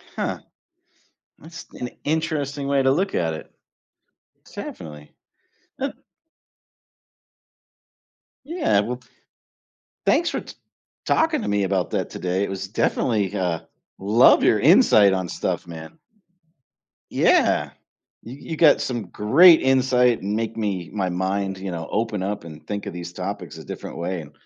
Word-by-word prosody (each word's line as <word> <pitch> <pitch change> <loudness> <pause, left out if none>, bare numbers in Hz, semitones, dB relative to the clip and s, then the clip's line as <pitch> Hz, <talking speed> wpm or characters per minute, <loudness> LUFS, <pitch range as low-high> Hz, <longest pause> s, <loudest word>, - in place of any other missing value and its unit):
Huh. - - -2 1.0
That's 165 +2 -11
an 125 - -6
interesting 145 -3 -2
way 140 -1 +2
to 130 - +3
look 190 +6 -1
at 80 -2 0
it. - - -9 1.0
Definitely. 75 -2 -9 0.7
Ah 275 +1 -2 2.5
Yeah, 300 - +1
well 120 +4 -4 1.1
thanks 340 - +3
for - - -3
t - - -11 0.5
talking 320 -3 +2
to - - -4
me 100 0 +1
about 95 -2 -1
that - - -2
today, 90 +2 -2
it - - -2
was 95 -1 -5
definitely, 105 -3 0
uh, 90 -4 -1 0.4
love 105 +5 +5
your - - +4
insight 100 -2 +6
on 95 -1 -2
stuff, - - -3
man. 80 - -10 1.1
Yeah, - - +3 0.5
you 130 +7 -10
you 160 - -3
got 155 -4 +5
some 120 -7 -3
great 160 - +6
insight 130 -2 +3
and 100 +2 -2
make 115 0 -3
me 95 -6 -2
my 95 -3 -1
mind, 95 +2 -2
you 95 -1 -5
know, 80 -1 -5
open 105 -3 -1
up 100 -2 -3
and 80 -2 -12
think 100 -1 -4
of - - -6
these 85 0 -7
topics 90 -2 -6
a - - -9
different - - -8
way, 85 0 -3
and 75 - -13
100 Hz, 140 wpm, -23 LUFS, 90-135 Hz, 2.5 s, insight